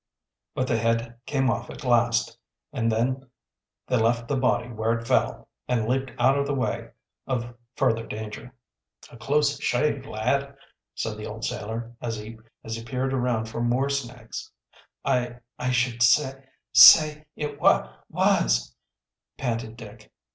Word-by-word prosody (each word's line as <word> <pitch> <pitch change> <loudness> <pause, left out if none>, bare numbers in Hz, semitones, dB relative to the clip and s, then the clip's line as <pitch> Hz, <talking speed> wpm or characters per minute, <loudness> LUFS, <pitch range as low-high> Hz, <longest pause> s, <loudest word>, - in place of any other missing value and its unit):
But 130 - 0
the 115 -3 +1
head 115 +1 -1
came 135 -2 +1
off - - -4
at - - -9
last 120 -2 +2 0.4
and 115 -1 0
then 130 +4 -1 0.6
they 125 - +1
left 115 +1 +1
the 145 - 0
body 125 -2 +1
where 115 0 -1
it 115 0 -9
fell, - - +1 0.2
and 115 -3 0
leaped 130 +2 0
out 135 +2 +3
of 140 - 0
the 145 - -1
way 130 - -2 0.4
of 120 -2 -2 0.2
further 115 -4 +1
danger. 110 +3 -7 0.6
"A 120 - -12
close 145 +4 +1
shave, 150 +5 0
lad," 140 +6 -1 0.4
said 110 -1 -3
the 105 - -6
old 110 +2 -5
sailor, 115 0 -4
as 115 -2 -3
he 110 +1 -9 0.4
peered 130 +3 -2
around 120 -3 0
for 110 +1 -5
more 125 +4 +1
snakes. 125 -4 -5 0.6
"I 125 -3 0 0.2
I 125 - -1
should 125 -1 0
sa 130 +4 +5 0.4
say 155 -1 +8
it 145 -1 -5
wa - - +3 0.2
was," - - +2 0.6
panted 115 -3 -3
Dick. 110 -3 -12
120 Hz, 145 wpm, -25 LUFS, 115-135 Hz, 0.6 s, say